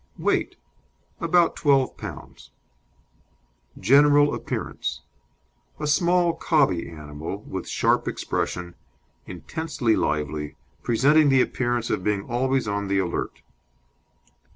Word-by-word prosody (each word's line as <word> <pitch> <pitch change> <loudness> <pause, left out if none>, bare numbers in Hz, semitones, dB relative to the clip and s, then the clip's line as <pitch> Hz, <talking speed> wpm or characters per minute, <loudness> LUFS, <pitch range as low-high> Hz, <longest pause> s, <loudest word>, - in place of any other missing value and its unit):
WEIGHT - - 0 0.6
About 170 0 +3
twelve 140 -3 +2
pounds. - - -10 1.3
GENERAL 145 +6 +5
APPEARANCE - - -4 0.8
A - - -3
small 170 +3 +3
cobby 145 - +1
animal 75 +5 -7
with 95 -1 -6
sharp - - +1
expression, 90 -1 -3 0.5
intensely 125 - -2
lively, 75 0 -2 0.3
presenting 145 +6 +4
the 135 -1 +5
appearance 120 -2 -2
of - - -1
being 105 -1 0
always 130 +2 0
on 100 0 -2
the 100 0 +1
alert. 90 -3 -3
120 Hz, 100 wpm, -24 LUFS, 95-145 Hz, 1.3 s, GENERAL